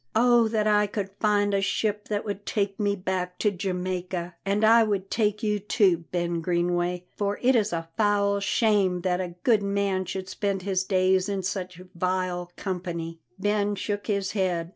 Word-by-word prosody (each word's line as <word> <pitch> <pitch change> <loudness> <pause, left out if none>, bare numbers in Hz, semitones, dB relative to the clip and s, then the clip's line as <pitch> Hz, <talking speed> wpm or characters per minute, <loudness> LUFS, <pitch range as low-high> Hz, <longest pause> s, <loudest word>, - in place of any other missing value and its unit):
Oh, 240 0 +5
that 215 -1 0
I 210 -1 +3
could 200 -1 -4
find 205 -1 +2
a 195 - +2
ship 210 +1 -1
that 205 0 -2
would 205 -1 -4
take 200 -2 -1
me 205 -1 +1
back 180 -1 -3
to 210 - +2
Jamaica! 180 -2 -3
And 200 +2 +1
I 230 +1 +7
would 200 -3 -1
take 210 -1 0
you 210 -1 +1
too, 190 -4 +2
Ben 175 -1 -1
Greenway, 175 +1 0
for 205 0 -1
it 260 +1 +5
is 215 -2 +2
a 165 -1 -3
foul 205 -2 +2
shame 200 -3 +2
that 180 0 0
a 175 -2 -5
good 225 -4 +4
man 200 -1 0
should 190 +1 -5
spend 195 0 -2
his 190 -1 0
days 185 0 +2
in 195 -1 -2
such 180 -1 -4
vile 180 0 -2
company." 170 -3 -4 0.2
Ben 205 +1 0
shook 205 +1 -3
his 200 -3 0
head. 180 -5 -1
195 Hz, 180 wpm, -26 LUFS, 180-205 Hz, 0.2 s, I